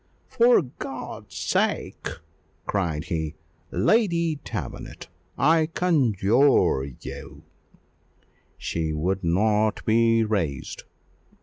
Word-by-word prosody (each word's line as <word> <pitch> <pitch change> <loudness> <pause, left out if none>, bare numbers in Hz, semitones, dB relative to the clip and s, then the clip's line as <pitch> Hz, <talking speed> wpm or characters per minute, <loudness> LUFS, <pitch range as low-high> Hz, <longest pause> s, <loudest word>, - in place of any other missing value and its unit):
"For 235 -5 +5
God's 130 0 -8
sake!" - - -1 0.6
cried 85 -6 -1
he, 80 -3 -3 0.3
"Lady 170 -8 +2
Davenant! - - -6 0.3
I 155 +4 +4
conjure 130 - +3
you - - -9 0.6
" - - -38
She 80 -1 -2
would 95 +5 -1
not 105 +5 +1
be 115 0 +4
raised. 100 -10 -2
110 Hz, 85 wpm, -25 LUFS, -, 0.6 s, For